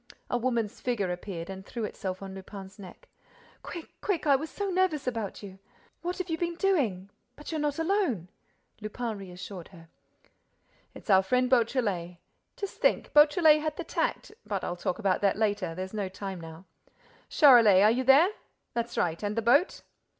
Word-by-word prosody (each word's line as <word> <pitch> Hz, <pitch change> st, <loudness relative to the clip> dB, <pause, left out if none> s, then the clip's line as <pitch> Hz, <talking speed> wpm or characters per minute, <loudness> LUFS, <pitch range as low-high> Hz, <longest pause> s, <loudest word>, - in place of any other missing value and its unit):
A 245 Hz, -, +2 dB
woman's 235 Hz, -4 st, -1 dB
figure 210 Hz, -7 st, -1 dB
appeared 175 Hz, -2 st, -6 dB
and 190 Hz, 0 st, -8 dB
threw 230 Hz, +3 st, -6 dB
itself 190 Hz, -2 st, -5 dB
on 190 Hz, -1 st, -7 dB
Lupin's 195 Hz, +1 st, -10 dB
neck: 200 Hz, -, -12 dB, 0.5 s
"Quick, 340 Hz, -2 st, -9 dB
quick, 390 Hz, -6 st, -1 dB
I 285 Hz, -2 st, +5 dB
was 305 Hz, +4 st, -3 dB
so 400 Hz, -1 st, -3 dB
nervous 365 Hz, -6 st, +1 dB
about 225 Hz, -5 st, -4 dB
you. 195 Hz, -1 st, -10 dB, 0.4 s
What 355 Hz, +1 st, -3 dB
have 370 Hz, -2 st, -3 dB
you 325 Hz, -2 st, -3 dB
been 345 Hz, -1 st, -2 dB
doing?—But 285 Hz, -, -2 dB
you're 315 Hz, -2 st, -2 dB
not 295 Hz, -1 st, -1 dB
alone!—" 325 Hz, -, 0 dB, 0.5 s
Lupin 220 Hz, +2 st, -4 dB
reassured 185 Hz, -1 st, -9 dB
her: 165 Hz, -3 st, -16 dB, 1.1 s
"It's 220 Hz, -, -4 dB
our 190 Hz, 0 st, +7 dB
friend 250 Hz, +6 st, +1 dB
Beautrelet.—Just 225 Hz, -, -2 dB
think, -, -, +1 dB
Beautrelet 300 Hz, +1 st, +6 dB
had 305 Hz, -1 st, -3 dB
the 345 Hz, -, -3 dB
tact—but 325 Hz, -, -3 dB
I'll 175 Hz, -, -3 dB
talk 175 Hz, 0 st, -2 dB
about 195 Hz, -4 st, 0 dB
that 200 Hz, -1 st, +2 dB
later—there's 190 Hz, -4 st, -2 dB
no 205 Hz, -3 st, -2 dB
time 190 Hz, -1 st, -6 dB
now.—Charolais 195 Hz, -, +3 dB
are 215 Hz, -, +6 dB
you 255 Hz, +3 st, 0 dB
there? 275 Hz, +8 st, +6 dB, 0.4 s
That's 235 Hz, 0 st, -3 dB
right!—And 180 Hz, +5 st, -1 dB
the 230 Hz, -, 0 dB
boat?" 280 Hz, -, +3 dB
220 Hz, 160 wpm, -28 LUFS, 190-295 Hz, 1.1 s, our